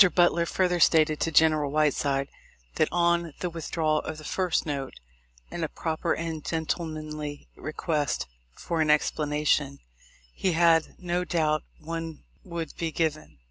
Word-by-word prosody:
Butler 175 -1 +4
further 180 -1 +1
stated 155 -2 +4
to 165 - 0
General 155 -2 +4
Whiteside, 140 -2 +1 0.5
that, - - +4
on 170 -2 +1
the 180 - -2
withdrawal 160 -1 0
of 160 - -5
the 155 - -10
first 180 +2 0
note, 140 -3 -4 0.6
and 170 - -3
a 160 - -1
proper 165 +1 -1
and 160 -2 -4
gentlemanly 155 -2 -4
request 155 -2 -2 0.3
for 165 - -2
an 155 - +2
ex 150 0 +4
planation, 150 -2 0 0.6
he 185 - 0
had 165 -1 +4
no 180 0 -1
doubt 155 -3 +1 0.2
one 165 0 -6 0.2
would 165 -2 -5
be 165 -1 -2
given. 155 -1 -2
160 Hz, 140 wpm, -27 LUFS, 150-170 Hz, 0.6 s, Butler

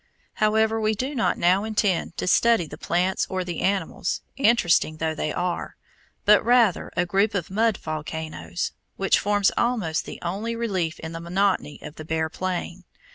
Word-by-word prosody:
However 220 +1 +3
we 215 0 +1
do 260 +7 -3
not 240 -5 +1
now 185 +3 +3
intend 205 -5 0
to - - -2
study 225 +1 +4
the 150 - -9
plants 180 +3 0
or 185 -1 -2
the 175 -2 -5
animals, 190 -2 -1
interesting 215 - +3
though 160 0 -1
they 155 0 -2
are, 180 +1 -3 0.5
but 210 0 +6
rather 235 -5 +3
a 180 - +2
group 200 +4 +1
of 180 -2 -3
mud 220 +1 +2
volcanoes, 155 +2 -4 0.3
which 195 -1 +3
forms 205 -1 +2
almost 215 -10 0
the - - -7
only 205 +7 -3
relief 190 -8 -2
in 160 - -6
the 165 0 -6
monotony 180 -3 0
of 150 +1 -9
the 155 - -7
bare 160 0 -1
plain. 185 +1 -4
190 Hz, 170 wpm, -24 LUFS, 165-215 Hz, 0.5 s, but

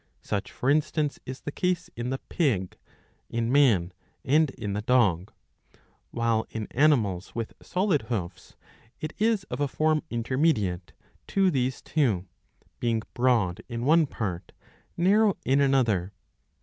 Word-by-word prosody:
Such 100 0 -3
for 125 - -4
instance, 150 0 0
is 130 +1 -6
the 145 - -5
case 180 +2 -1
in 120 +1 -3
the 135 - -1
pig,^ 115 - -1 0.6
in 115 0 -1
man, 110 -11 +4 0.3
and 150 +3 +4
in 110 -6 -5
the 105 - -2
dog. 105 -7 +2 0.8
While 115 -1 0
in 110 -1 -4
animals 115 - +2
with 115 -1 -4
• - - -18
solid 180 -5 +1
hoofs 90 -7 -5 0.4
it 155 0 -5
is 220 -2 +2
of - - -3
a 145 - +2
form 155 +2 +1
intermediate 115 - 0 0.3
to 195 -2 +2
these 130 -3 -1
two, 115 - +1 0.5
being' 115 -2 0
broad 120 -8 +1
in 120 0 -3
one 160 +1 +5
part, 95 -8 -5 0.4
narrow 200 +3 +3
in 135 +2 +3
another. 115 -9 +2
125 Hz, 140 wpm, -27 LUFS, 105-155 Hz, 0.8 s, one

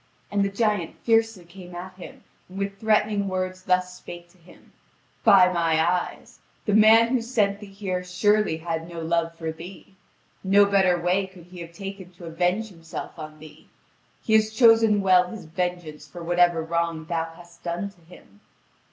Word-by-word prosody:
And 200 -1 +1
the 200 - 0
giant 205 -4 -1
fiercely 225 -5 +1
came 175 0 -12
at 180 +1 -8
him, 185 -1 -12 0.3
and 185 - -11
with 195 0 -4
threatening 210 -2 +1
words 185 0 -3
thus 180 0 +1
spake 175 -1 -11
to 180 - -26
him: 170 +2 -20 0.5
"By 185 -2 +6
my 165 -2 +1
eyes, 175 +2 -2 0.3
the 210 - 0
man 220 +2 +6
who 255 -1 +1
sent 215 -4 0
thee 205 - -10
here 190 -2 -4
surely 205 0 +1
had 165 0 -4
no 170 -1 -7
love 165 0 -1
for 160 -1 -4
thee! 175 +4 -12 0.5
No 200 +1 +5
better 190 -3 +3
way 180 +3 0
could 185 -2 -15
he 180 +1 -13
have 170 0 -9
taken 195 0 -8
to 175 - -12
avenge 180 +6 -1
himself 165 -1 -9
on 155 0 -8
thee. 155 0 -15 0.6
He 220 - -1
has 215 0 +4
chosen 225 -2 +5
well 185 -2 +4
his 205 -1 -9
vengeance 165 -3 -4
for 175 +3 -10
whatever 175 -1 +2
wrong 165 -1 -2
thou 165 0 -3
hast 170 0 -17
done 175 +4 -4
to 180 - -26
him." 160 - -18
180 Hz, 180 wpm, -24 LUFS, 170-200 Hz, 0.6 s, By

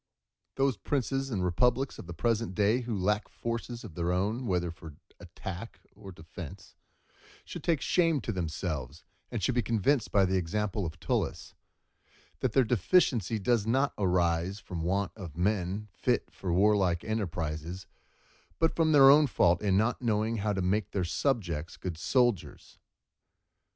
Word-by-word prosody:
Those 135 -4 +1
princes 135 +4 -1
and 95 -7 -1
republics 125 +9 +1
of - - -9
the 90 - -6
present 115 0 0
day 105 +4 +3
who 115 -3 -3
lack 105 +3 0
forces 120 0 -5
of 105 -7 -9
their 85 +1 -1
own, 105 +7 -1
whether 90 -3 0
for 80 -3 -11 0.2
attack 90 +4 -8 0.2
or 95 - -10
defence, 90 +2 -10 0.7
should - - -8
take 165 -5 +1
shame 165 -4 +2
to - - -3
themselves, 80 - -4 0.3
and 115 -5 -4
should 125 - +2
be 120 - +2
convinced 115 +4 +1
by 100 -2 +4
the 95 0 +1
example 100 +2 -1
of 80 - -9
Tullus, - - -2 0.9
that - - -1
their 135 - +5
deficiency 115 - +2
does 110 0 +1
not 135 +5 +2
arise 90 0 +1
from 90 -4 -6
want 95 +3 0
of 85 -7 -9
men 100 +2 -1
fit - - -1
for 95 - -4
warlike 95 -2 +3
enterprises, 90 -4 -3 0.7
but 165 0 +1
from 160 -2 +3
their 135 -2 +9
own 150 +1 +6
fault 85 -8 +3
in 100 -3 +2
not 110 +5 +1
knowing 110 -1 0
how 105 0 0
to 95 -2 -1
make 100 +3 0
their 95 -3 -1
subjects 85 - -1
good 90 -3 -5
soldiers. 120 -3 0
100 Hz, 155 wpm, -29 LUFS, 90-120 Hz, 0.9 s, their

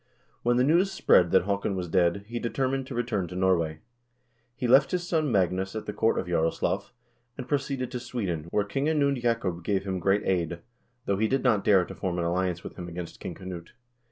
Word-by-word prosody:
When 120 0 +2
the 125 - +4
news 170 +7 +3
spread 90 - +4
that - - +4
Haakon 100 0 -1
was 90 -1 -3
dead, 90 +2 +2
he 120 +1 -4
determined 130 +2 -1
to 130 - -6
return 115 -6 -1
to 90 - -8
Norway. 85 -4 +1 0.7
He 125 - -2
left 135 +3 +6
his 175 -1 -2
son 155 -5 +1
Magnus 95 0 +1
at 110 - -4
the 105 - -4
court 110 +2 +1
of - - -1
Jaroslaf, 80 -2 0 0.5
and 130 - -6
proceeded 135 -3 -2
to 125 - -3
Sweden, 95 -11 -3
where 105 +3 +1
King 135 +7 -2
Anund 140 -4 +1
Jacob 105 -8 -1
gave 95 +1 0
him 95 -2 -3
great 100 +3 +2
aid, 85 -2 -1 0.4
though 100 - 0
he 110 +2 +2
did 135 +4 0
not 115 -6 +3
dare 95 -3 +4
to - - -9
form 90 -2 -3
an 85 - -1
alliance 90 0 -1
with - - -9
him 90 - -6
against 85 0 -7
King - - -6
Knut. 90 -2 -8
100 Hz, 215 wpm, -27 LUFS, 90-125 Hz, 0.7 s, left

